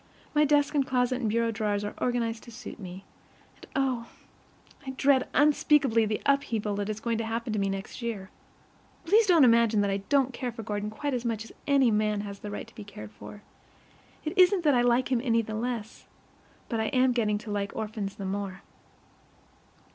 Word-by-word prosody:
My 300 0 +4
desk 290 0 +3
and 285 -2 +3
closet 255 -1 0
and 225 - 0
bureau 230 +1 +1
drawers 210 -2 -1
are 205 - -4
organized 235 -2 -1
to 235 - -11
suit 240 +1 -9
me; 190 0 -9 0.5
and, - - -15
oh, 255 -4 0 0.7
I 270 - -7
dread 270 -1 +3
unspeakably 280 -5 +4
the 215 - 0
thought - - -6
of 280 - 0
the - - -13
upheaval 210 -3 -2
that 205 0 -2
is 215 0 -3
going 230 0 -1
to - - -1
happen 225 0 -3
to 215 - 0
me 195 0 0
next 195 +5 -5
year! 215 -5 -4 0.7
Please 435 +1 +4
don't 340 -5 +6
imagine 230 -3 +5
that 200 -1 +1
I 195 - 0
don't 270 -2 +3
care 250 -1 -3
for 225 -1 -8
Gordon 210 0 -3
quite 285 +6 -3
as 245 -2 -2
much 225 -2 -2
as - - -13 0.2
any 275 -4 +4
man 210 -1 +1
has 200 -1 -8
a 210 - -5
right 205 - -5
to 230 - -18
be 215 - -9
cared 110 - -10
for. 205 - -12 0.8
It 310 - -3
isn't 365 0 +5
that 295 -3 +4
I 245 - +4
like 245 +2 +2
him 245 -2 +2
any 230 -3 +2
the 220 - -6
less, 230 0 -4 0.6
but 230 - -2
I 220 - 0
am 255 +2 +3
getting 215 -4 +1
to 215 0 -8
like 200 -1 -2
orphans 210 -2 -4
the 195 - -6
more. 195 0 -4
230 Hz, 215 wpm, -28 LUFS, 210-255 Hz, 0.8 s, don't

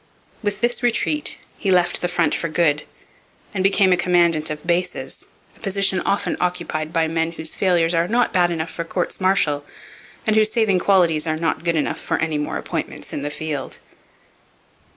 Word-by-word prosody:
With 205 -2 -2
this 240 +2 +1
retreat 250 +5 +1 0.2
he 200 - -1
left 175 -2 +3
the 175 - +1
front 175 -1 +1
for 165 - -1
good 155 -2 +1 0.7
and 190 -2 -1
became 195 -1 +4
a - - +5
commandant 170 -3 +3
of 150 0 -6
bases, 175 +1 -2 0.3
a - - -21
position 195 -2 +1
often 200 - 0
occupied 160 -3 -2
by 165 -1 +1
men 165 +1 -1
whose 160 -1 -5
failures 175 -3 +2
are 165 +1 +2
not 240 +4 +1
bad 175 -2 +3
enough 165 -1 -3
for 170 - -4
courts 175 +3 -3
martial 175 -7 +2 0.6
and 215 - +2
whose 215 0 +4
saving 215 -5 +2
qualities 170 -5 +3
are 155 0 0
not 160 0 -1
good 170 -1 +1
enough 155 - -1
for - - -1
any 160 -2 -1
more 150 - -2
appointments - - -5
in - - -3
the 145 - -3
field. 145 -2 -5
175 Hz, 180 wpm, -21 LUFS, 160-195 Hz, 0.7 s, a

